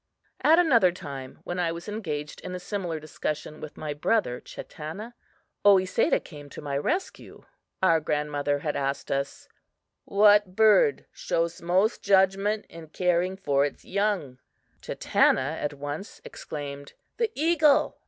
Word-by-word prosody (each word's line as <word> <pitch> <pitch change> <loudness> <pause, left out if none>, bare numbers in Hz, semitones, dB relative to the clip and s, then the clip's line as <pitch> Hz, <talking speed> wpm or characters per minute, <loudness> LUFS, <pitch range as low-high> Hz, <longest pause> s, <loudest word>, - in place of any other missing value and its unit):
At 320 +2 +6
another 240 - +5
time, 140 -7 -8
when 175 +1 -4
I 170 -2 +1
was 170 +3 -7
engaged 155 -9 -5
in 180 0 -6
a - - -5
similar 180 -3 -4
discussion 155 0 -5
with 155 - -9
my 150 -1 -4
brother 145 - 0
Chatanna, 195 +10 -8 0.5
Oesedah 190 -2 +4
came 145 -3 -12
to - - -10
my 145 -2 -4
rescue. 350 - -3 0.4
Our 165 -3 +5
grandmother 145 -1 -1
had 145 +1 -3
asked 140 0 -2
us: 140 0 -3 0.6
"What 205 -2 +4
bird 220 - +4
shows 170 - -2
most 185 +6 +1
judgment 195 +2 +2
in 165 -1 -11
caring 180 +3 0
for 140 -7 +1
its 145 - -4
young?" 195 -10 -1 0.4
Chatanna 140 +5 +1
at 145 0 -2
once 145 +7 -6
exclaimed: 140 -2 -7 0.2
"The 460 -2 0
eagle!" 305 -2 +3
175 Hz, 135 wpm, -26 LUFS, 145-205 Hz, 0.6 s, At